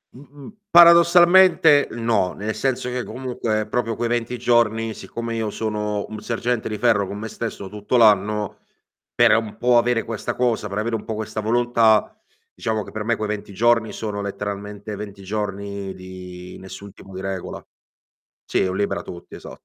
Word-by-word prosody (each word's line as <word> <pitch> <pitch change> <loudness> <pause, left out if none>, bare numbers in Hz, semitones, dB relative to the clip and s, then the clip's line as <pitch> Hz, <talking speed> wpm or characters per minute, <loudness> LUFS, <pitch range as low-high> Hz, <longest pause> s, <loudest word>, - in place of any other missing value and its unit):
Mh-mh. 140 +7 -13 0.2
Paradossalmente 170 -2 +7
no, 115 -6 0
nel 105 +1 -4
senso 130 -2 -1
che 125 -1 -3
comunque 115 -3 -3
proprio 115 0 -1
quei 120 +1 -2
20 120 +1 -2
giorni, 115 -2 +1
siccome 115 +1 -6
io 110 -2 -2
sono 105 -1 -3
un 110 -1 -7
sergente 120 +1 -2
di 110 - -4
ferro 105 -4 +2
con 100 - -6
me 110 - -5
stesso 110 -3 -6
tutto 105 +4 -1
l'anno, 105 -2 +3 0.6
per - - +5
un 110 -2 -2
po' 125 0 +3
avere 120 -1 +2
questa 115 -2 -4
cosa, 120 -4 0
per 100 +1 -4
avere 115 +2 -1
un 110 - -5
po' 110 - -4
questa 110 0 -4
volontà, 115 -1 +3 0.4
diciamo 110 -2 -2
che - - -12
per 110 - -4
me 115 +2 +1
quei 110 -1 -4
20 105 -1 -5
giorni 115 +2 +2
sono 105 -2 -4
letteralmente 100 +1 -5
20 100 -1 -9
giorni 100 -1 -4
di 90 -1 -10
nessun 100 +1 -10
tipo 95 - -14
di 95 - -6
regola. 95 -1 -5 0.8
Sì, - - +1
è - - +1
un 90 - -3
libera 100 - -1
tutti, 85 - -10
esa - - -10
110 Hz, 175 wpm, -22 LUFS, 100-120 Hz, 0.8 s, Paradossalmente